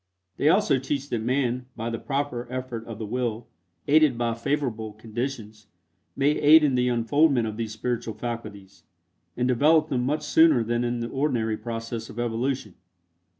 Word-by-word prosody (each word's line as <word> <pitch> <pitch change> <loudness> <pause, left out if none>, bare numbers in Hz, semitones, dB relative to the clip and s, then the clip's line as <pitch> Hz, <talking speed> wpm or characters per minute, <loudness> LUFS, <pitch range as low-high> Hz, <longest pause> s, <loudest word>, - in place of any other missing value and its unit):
They 150 - +3
also 165 -7 +3
teach 140 +1 -3
that 115 - -1
man, 125 +1 -1
by 115 0 -4
the 115 - -3
proper 135 -4 -3
effort 125 -3 -5
of 115 -2 -7
the 110 - -5
will, 120 0 -2 0.4
aided 150 -4 +4
by 120 -1 0
favorable 115 -3 -2
conditions, 110 -1 -6 0.5
may 140 +2 +3
aid 150 +1 +6
in 145 -3 +3
the 125 0 +2
unfoldment 125 +2 +2
of 110 - -5
these 110 -1 -4
spiritual 115 -1 -3
faculties, 100 -5 -7 0.6
and 125 0 +1
develop 155 +5 +3
them 130 -4 0
much 150 +4 -1
sooner 155 -4 +4
than 120 +1 -1
in 120 0 -2
the 115 - -3
ordinary 120 -6 0
process 115 0 -5
of - - -11
evolution. 120 -2 -2
120 Hz, 165 wpm, -25 LUFS, 115-140 Hz, 0.6 s, aid